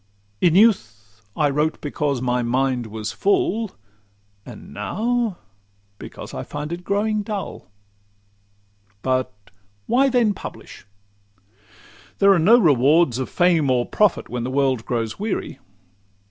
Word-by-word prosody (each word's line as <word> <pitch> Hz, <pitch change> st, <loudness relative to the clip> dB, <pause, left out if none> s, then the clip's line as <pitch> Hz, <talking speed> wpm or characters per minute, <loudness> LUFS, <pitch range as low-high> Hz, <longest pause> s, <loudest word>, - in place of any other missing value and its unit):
In 170 Hz, -2 st, +4 dB
youth 110 Hz, -, +2 dB, 0.2 s
I 150 Hz, -, +3 dB
wrote 150 Hz, +2 st, 0 dB
because 145 Hz, -3 st, -2 dB
my 125 Hz, 0 st, 0 dB
mind 125 Hz, 0 st, 0 dB
was 110 Hz, 0 st, -5 dB
full, 350 Hz, -, 0 dB, 0.7 s
And -, -, -11 dB
now 230 Hz, -2 st, -1 dB, 0.6 s
because -, -, -10 dB
I 65 Hz, -, -4 dB
feel 145 Hz, -, -6 dB
it 175 Hz, +1 st, -7 dB
growing 210 Hz, +2 st, 0 dB
dull. 205 Hz, -1 st, -6 dB, 1.4 s
But 130 Hz, -1 st, 0 dB, 0.5 s
'why 270 Hz, -, +3 dB
then 240 Hz, -5 st, +2 dB
publish?'—There 100 Hz, -, -5 dB
are 185 Hz, -, +2 dB
no 210 Hz, +9 st, +6 dB
rewards 145 Hz, -, +3 dB
Of 130 Hz, -, -3 dB
fame 170 Hz, -5 st, +2 dB
or 125 Hz, -1 st, +2 dB
profit 210 Hz, -4 st, +1 dB
when 120 Hz, -1 st, -4 dB
the 125 Hz, -, -3 dB
world 130 Hz, -3 st, 0 dB
grows 115 Hz, -, -2 dB
weary. 215 Hz, 0 st, -3 dB
145 Hz, 120 wpm, -22 LUFS, 120-200 Hz, 1.4 s, no